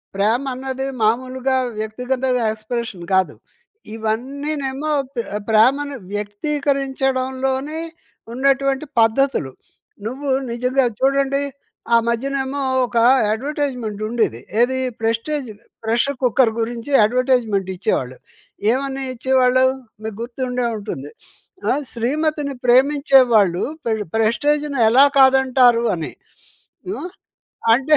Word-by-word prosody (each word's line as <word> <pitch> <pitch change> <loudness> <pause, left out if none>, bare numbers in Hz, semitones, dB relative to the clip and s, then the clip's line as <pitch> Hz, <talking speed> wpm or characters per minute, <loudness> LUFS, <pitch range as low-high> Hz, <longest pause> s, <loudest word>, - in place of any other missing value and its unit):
ప్రేమ 220 +6 +1
అన్నది 265 +1 -4 0.2
మామూలుగా 255 +4 +1 0.2
వ్యక్తిగతగా 250 +3 -1
ఎక్స్‌ప్రెషన్ 220 -3 -5
కాదు. 190 -1 +2 0.6
ఇవన్నీనేమో 270 +6 -3 0.3
ప్రె 235 - -2 0.2
ప్రేమను 270 +6 +3 0.2
వ్యక్తీకరించడంలోనే 265 +4 -1 0.5
ఉన్నటువంటి 275 +2 +1
పద్ధతులు. 225 - +2 0.5
నువ్వు 270 +5 -4 0.2
నిజంగా 250 +3 +1
చూడండి. 275 +1 +2 0.5
ఆ - - +8
మధ్యనేమో 270 +3 -1 0.2
ఒక 240 - -4 0.3
యడ్వర్టైజ్‌మెంట్ 250 -3 -3
ఉండేది. 220 - -1 0.2
ఏది 260 +2 +2 0.2
ప్రెస్టీజ్ 230 +5 -1 0.4
ప్రెషర్ 240 +4 0
కుక్కర్ 245 -1 +3
గురించి 230 +3 -4
యడ్వర్టైజ్‌మెంట్ 235 -4 +1
ఇచ్చేవాళ్ళు. 130 -7 -2 0.5
ఏవని 270 +1 -2
ఇచ్చేవాళ్ళు! 255 0 +3 0.4
మీకు 220 -2 -5
గుర్తుండే 250 +1 -3
ఉంటుంది. 150 -9 -6 0.6
ఆహ్, 290 +3 +1
శ్రీమతిని 290 +4 -1
ప్రేమించేవాళ్ళు 250 - +4 0.2
పెర్ 220 -2 0
ప్రెస్టీజ్‌ని 285 +5 +1
ఎలా 260 +5 +7
కాదంటారు 260 -3 +5
అని. 165 -2 -5 0.8
హ్మ్. 360 -3 -4 0.7
అంటే 275 +5 +3
255 Hz, 90 wpm, -20 LUFS, 225-275 Hz, 0.8 s, ఆ